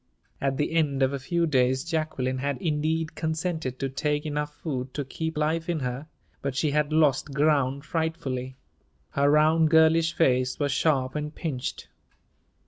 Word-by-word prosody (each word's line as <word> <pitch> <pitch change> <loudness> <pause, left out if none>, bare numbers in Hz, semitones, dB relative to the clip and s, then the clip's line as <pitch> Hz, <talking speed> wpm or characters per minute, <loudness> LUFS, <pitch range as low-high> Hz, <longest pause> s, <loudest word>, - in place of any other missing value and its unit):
At 135 -1 0
the 150 - 0
end 145 -5 +1
of 130 +1 +2
a 140 - -2
few 170 +6 0
days 130 -3 +2
Jacqueline 155 -6 -2
had 140 0 -1
indeed 155 +1 -1
consented 160 -4 -2
to 135 - -2
take 150 +3 -1
enough 150 0 -2
food 130 -5 -5
to 145 - -2
keep 160 +4 -4
life 160 +2 0
in 165 -4 -1
her, 125 +4 -4 0.3
but 140 -2 -3
she 145 +2 +1
had 150 +1 +1
lost 150 -2 +2
ground 140 -2 +2
frightfully. 155 -6 -3 0.6
Her 140 +1 +2
round, 155 +2 +4
girlish 160 +1 +4
face 130 -6 +2
was 145 -2 0
sharp 130 -2 +1
and 150 0 -4
pinched. 135 -7 -4
150 Hz, 160 wpm, -26 LUFS, 135-160 Hz, 0.6 s, round